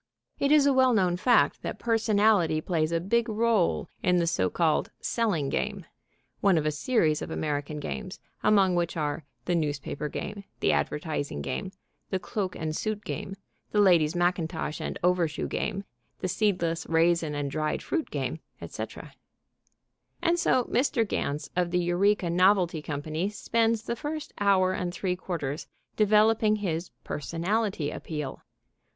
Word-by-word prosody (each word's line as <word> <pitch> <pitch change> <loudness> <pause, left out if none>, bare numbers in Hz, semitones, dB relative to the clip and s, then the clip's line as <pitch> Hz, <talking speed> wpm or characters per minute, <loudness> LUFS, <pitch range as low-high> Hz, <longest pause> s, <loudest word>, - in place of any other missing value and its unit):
It 280 - +2
is 300 -2 +6
a 280 - +4
well 260 -1 +4
known 180 -4 +2
fact 230 +5 +3
that - - -4
personality 215 -7 +3
plays 155 -1 0
a 165 - +1
big 230 +7 +1
rôle 220 -4 +1 0.2
in 180 0 +3
the 170 - +2
so 95 - +1
called 160 - +1
"selling 205 - 0
game" - - -2 0.5
(one 195 -4 +4
of 155 - 0
a 155 - +2
series 155 - +1
of - - -5
American 150 0 -2
games, 185 +5 -5 0.2
among 195 -3 +4
which 175 -1 -1
are 150 0 -2 0.2
"the 175 - 0
newspaper 150 -2 -2
game," 200 +5 -5 0.2
"the - - +3
advertising 145 - -2
game," 190 - -3 0.4
"the 190 - 0
cloak 185 0 -3
and 155 -1 -3
suit 215 +2 -3
game," 195 - -5 0.3
"the 210 - +1
ladies' 175 -5 +4
mackintosh 175 -3 -1
and - - -3
over 180 -1 +3
shoe 155 - -4
game," 200 -2 -2 0.4
"the 185 - -2
seedless 175 -4 0
raisin 165 -1 +2
and 145 -1 -2
dried 155 0 -1
fruit 325 -3 -2
game," 140 +2 -3 0.2
etc.), - - -7 1.1
and 345 +1 +2
so 255 -6 +3
Mr. 240 -2 +1
Ganz 145 -6 -2
of 180 -1 +1
the 180 - 0
Eureka 180 +1 +2
Novelty 180 -2 +3
Company 155 +5 -3
spends 225 +1 0
the 235 - -2
first 305 +4 -5
hour 190 -2 +3
and 180 -1 -2
three 180 +1 -2
quarters 165 -6 -4 0.3
developing 215 +1 +4
his 175 -5 -2
"personality 170 +1 -1
appeal." 150 -4 -5
180 Hz, 155 wpm, -27 LUFS, 155-210 Hz, 1.1 s, is